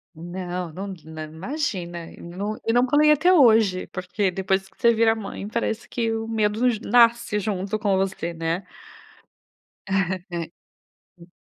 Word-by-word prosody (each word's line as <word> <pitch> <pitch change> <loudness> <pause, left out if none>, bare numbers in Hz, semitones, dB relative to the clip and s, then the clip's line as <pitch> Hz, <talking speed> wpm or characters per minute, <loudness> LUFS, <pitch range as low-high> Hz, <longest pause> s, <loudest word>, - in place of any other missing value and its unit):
Não, 175 +1 -5
num 195 +4 -5
nã 160 0 -7
imagina. 175 - -4
Eu - - -13
n 205 +6 -3
não 245 +2 +4
pulei 300 +3 +5
até 320 +5 +4
hoje. 220 - +5
Porque 185 +1 -2
depois 190 +1 -1
que - - -29
você 235 0 +5
vira 225 0 +3
mãe, 205 -2 -6
parece 225 0 -2
que 230 -2 -1
o 225 0 -3
medo 220 +2 +1
j 225 -4 -1
nasce 235 -1 +4
junto 200 +1 -2
com 200 -3 +1
você, 190 -3 -2
né. 165 +3 -2 1.2
Né. 180 -3 -2 0.6
Hum. 175 0 -17
195 Hz, 145 wpm, -24 LUFS, 180-225 Hz, 1.2 s, pulei